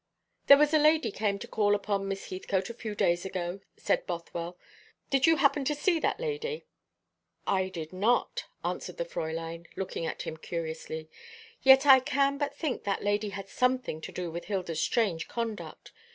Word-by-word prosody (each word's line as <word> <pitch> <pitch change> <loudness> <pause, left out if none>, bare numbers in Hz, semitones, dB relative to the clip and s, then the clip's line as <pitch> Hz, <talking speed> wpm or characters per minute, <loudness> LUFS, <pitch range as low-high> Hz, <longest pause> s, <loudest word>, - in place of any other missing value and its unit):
"There 280 - +10
was 300 +1 +3
a 310 - +6
lady 305 -6 +4
came 200 -1 0
to - - -8
call 205 -1 +2
upon 200 -1 -1
Miss 195 0 -5
Heathcote 190 +2 -2
a - - -8
few 220 -2 -6
days 175 -3 +2
ago," 185 -1 -4 0.2
said - - 0
Bothwell. 170 0 -5 0.5
"Did 270 +2 +4
you 325 - +6
happen 290 -2 +3
to 300 +2 +1
see 330 +3 +2
that - - 0
lady?" 465 0 -3 0.8
"I 190 -1 +1
did 165 -2 -7
not," 215 +6 +1 0.2
answered - - -3
the - - -2
Fräulein, 165 - -5
looking 185 -3 -3
at - - -4
him 160 - -5
curiously. 160 -1 -5 0.5
"Yet 270 +1 +7
I 270 -2 +9
can 275 +2 +1
but 285 -1 -2
think 290 -4 -2
that 200 -1 -1
lady 205 +1 +1
had 195 -1 -7
something 250 -9 0
to - - -7
do 175 -2 -4
with 170 +1 -6
Hilda's 180 -6 -2
strange 195 -9 +1
conduct. 230 -3 -5
205 Hz, 180 wpm, -29 LUFS, 175-275 Hz, 0.8 s, There